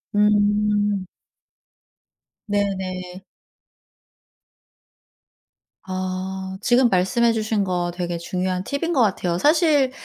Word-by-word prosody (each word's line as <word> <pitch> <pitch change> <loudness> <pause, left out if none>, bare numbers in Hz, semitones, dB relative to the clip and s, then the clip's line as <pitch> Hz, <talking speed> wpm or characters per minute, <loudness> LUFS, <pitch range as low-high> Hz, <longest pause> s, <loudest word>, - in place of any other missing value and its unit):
음. 205 -1 +2 1.4
네네. 190 -3 -3 2.6
아. 190 0 -4
지금 245 +2 +4
말씀해 225 +5 +2
주신 215 -2 0
거 175 -2 -1
되게 175 -1 -3
중요한 180 +2 -2
팁인 290 - -2
것 270 - +3
같아요. 185 -5 +1
사실 295 - +3
195 Hz, 150 characters per minute, -22 LUFS, 185-220 Hz, 2.6 s, 지금